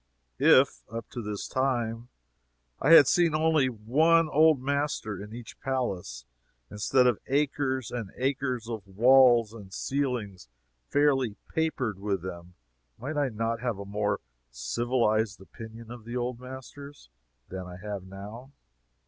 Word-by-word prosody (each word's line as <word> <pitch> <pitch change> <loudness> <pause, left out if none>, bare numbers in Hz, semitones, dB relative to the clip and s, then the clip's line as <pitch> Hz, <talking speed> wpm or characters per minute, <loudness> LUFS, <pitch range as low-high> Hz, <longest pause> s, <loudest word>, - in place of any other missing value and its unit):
If, - - +5
up 115 -1 -7
to 120 - -5
this 105 -2 -5
time, 120 -3 -1 0.7
I 145 - +1
had 150 - +10
seen 170 -3 +3
only 155 -4 +3
one 155 +9 +3
"old 155 -1 +5
master" 140 -7 -2
in 105 - -11
each 115 -1 -10
palace, 95 - -3 0.5
instead 125 +5 +2
of 120 -4 +2
acres 135 -3 0
and 115 -5 -4
acres 130 -3 -1
of 110 -4 -6
walls 120 +2 +5
and 100 -4 -11
ceilings 115 - -3 0.4
fairly 135 -6 +2
papered 130 -11 -1
with 100 -3 -2
them, 90 -1 -8 0.4
might 140 +6 -5
I 145 -2 +1
not 115 0 -2
have 120 -4 -2
a 100 - -7
more 105 +1 -1 0.3
civilized 110 - 0
opinion 115 +4 -11
of 120 -2 -9
the 120 +2 -5
old 120 0 -3
masters 130 - -11 0.4
than 95 -1 -6
I 90 0 -9
have 100 0 -5
now? 105 +7 -10
120 Hz, 140 wpm, -28 LUFS, 105-135 Hz, 0.7 s, had